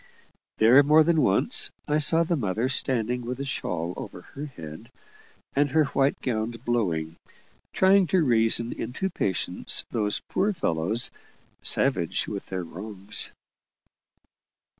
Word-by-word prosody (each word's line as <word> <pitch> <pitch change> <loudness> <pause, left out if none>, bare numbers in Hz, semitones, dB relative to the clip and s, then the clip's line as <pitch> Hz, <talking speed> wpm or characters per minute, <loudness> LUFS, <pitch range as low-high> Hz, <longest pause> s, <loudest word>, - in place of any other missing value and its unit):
There, 120 +6 +6
more 150 +2 +5
than 160 -1 +2
once, 95 - +3 0.2
I 150 +1 +1
saw 165 +2 +6
the 170 +1 -1
mother 110 - -1
standing, 125 -2 0
with 125 +2 -6
a 140 - -4
shawl 90 -9 -3
over 90 - -8
her 145 +2 -6
head, 80 - -11 0.7
and 145 +1 +2
her 155 +3 +3
white 140 -1 0
gown 110 -3 -1 0.2
blowing, 85 -9 -1 0.5
trying 190 0 +4
to 180 +1 +2
reason 115 -2 +3
into 130 +12 -4
patience 95 - -1
those 105 -3 0
poor 205 +2 0
fellows, 105 - 0 0.5
savage 95 -12 +1
with 100 -2 -6
their 95 -1 -4
wrongs. 100 +4 -6
120 Hz, 130 wpm, -25 LUFS, 95-145 Hz, 0.7 s, There